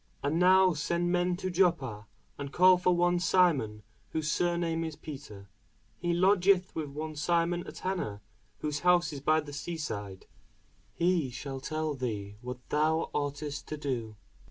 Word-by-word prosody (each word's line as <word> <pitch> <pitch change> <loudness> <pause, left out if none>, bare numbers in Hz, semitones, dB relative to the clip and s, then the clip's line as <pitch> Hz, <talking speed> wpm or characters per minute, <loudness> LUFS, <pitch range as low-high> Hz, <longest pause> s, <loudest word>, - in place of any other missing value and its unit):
And 150 +4 +1
now 185 0 +6
send 170 +3 -1
men 180 0 +1
to 185 0 -3
Joppa, 140 - +1 0.3
and 140 -1 -6
call 185 +2 +6
for 180 0 +3
one 175 0 +2
Simon, 150 - +2 0.3
whose 155 -1 -1
surname 170 -1 0
is 160 -2 -4
Peter: 135 -12 -10 0.5
he 175 0 -1
lodgeth 185 +1 +3
with 155 -3 -4
one 155 +2 -5
Simon 170 +3 +1
a - - -6
tanner, 170 - -3 0.4
whose 150 -1 -2
house 175 -1 +3
is 140 - -6
by 155 +2 +3
the 145 -1 -10
sea 165 +4 -4
side: 100 -11 -5 0.7
he 170 -5 +1
shall 135 +2 -6
tell 155 +2 -2
thee 105 -6 -4
what 125 0 -8
thou 155 +2 +1
oughtest 145 0 -3
to 155 - -4
do. 120 -7 -3
155 Hz, 155 wpm, -30 LUFS, 140-175 Hz, 0.7 s, now